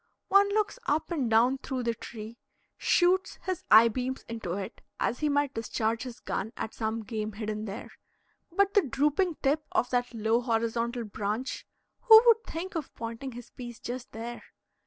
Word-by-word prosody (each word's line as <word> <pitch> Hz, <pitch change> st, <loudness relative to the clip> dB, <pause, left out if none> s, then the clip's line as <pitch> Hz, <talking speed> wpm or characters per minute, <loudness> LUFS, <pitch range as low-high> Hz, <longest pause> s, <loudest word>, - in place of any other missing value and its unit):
One 400 Hz, +1 st, +6 dB
looks 425 Hz, +4 st, 0 dB
up 315 Hz, +4 st, 0 dB
and 280 Hz, -8 st, 0 dB
down 240 Hz, +4 st, +4 dB
through 260 Hz, -2 st, -3 dB
the 235 Hz, 0 st, +1 dB
tree, 225 Hz, 0 st, -9 dB, 0.4 s
shoots 375 Hz, +2 st, +2 dB
his 370 Hz, -2 st, -3 dB
eye 220 Hz, +2 st, +9 dB
beams 255 Hz, +3 st, -3 dB
into 225 Hz, -7 st, -4 dB
it 195 Hz, 0 st, -5 dB, 0.2 s
as 240 Hz, -, 0 dB
he 300 Hz, -, +1 dB
might 285 Hz, -1 st, +1 dB
discharge 225 Hz, -1 st, -1 dB
his 250 Hz, -2 st, -7 dB
gun 220 Hz, +4 st, -3 dB
at 220 Hz, -, -4 dB
some 220 Hz, 0 st, -2 dB
game 215 Hz, -1 st, -4 dB
hidden 215 Hz, 0 st, -4 dB
there, 200 Hz, -1 st, -7 dB, 0.6 s
but 395 Hz, +3 st, +2 dB
the 410 Hz, -, +6 dB
drooping 300 Hz, +5 st, +1 dB
tip 295 Hz, +2 st, +2 dB
of -, -, +1 dB
that 245 Hz, -1 st, 0 dB
low 225 Hz, +1 st, +1 dB
horizontal 235 Hz, 0 st, -1 dB
branch 210 Hz, +4 st, -3 dB, 0.3 s
who 445 Hz, -2 st, +9 dB
would 455 Hz, -1 st, +6 dB
think 365 Hz, +4 st, -5 dB
of 325 Hz, -5 st, -4 dB
pointing 230 Hz, +3 st, -6 dB
his 245 Hz, 0 st, -10 dB
piece 240 Hz, -2 st, -9 dB
just 250 Hz, +2 st, -6 dB
there? 235 Hz, +2 st, -6 dB
245 Hz, 175 wpm, -29 LUFS, 225-300 Hz, 0.6 s, eye